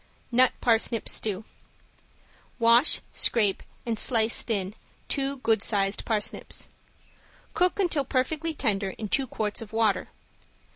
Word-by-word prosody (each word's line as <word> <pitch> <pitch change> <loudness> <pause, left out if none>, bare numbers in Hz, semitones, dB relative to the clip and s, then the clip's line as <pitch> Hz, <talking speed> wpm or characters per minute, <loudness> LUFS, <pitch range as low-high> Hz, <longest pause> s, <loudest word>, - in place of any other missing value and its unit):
~NUT 250 +1 +5
PARSNIP 230 -1 +1
STEW~ 210 -1 -1 1.1
Wash, 235 +4 +5
scrape 210 -5 +1 0.2
and 230 -2 -2
slice 230 -2 +3
thin 200 -4 -2 0.3
two 275 0 -2
good 225 -4 +1
sized 200 -2 0
parsnips. 215 -2 -2 0.8
Cook 360 +2 +1
until 340 -7 +1
perfectly 305 +5 -2
tender 200 -8 -1
in 215 -2 -5
two 270 +4 0
quarts 215 0 -3
of 220 -1 -10
water. 215 -4 +1
230 Hz, 115 wpm, -26 LUFS, 210-260 Hz, 1.1 s, ~NUT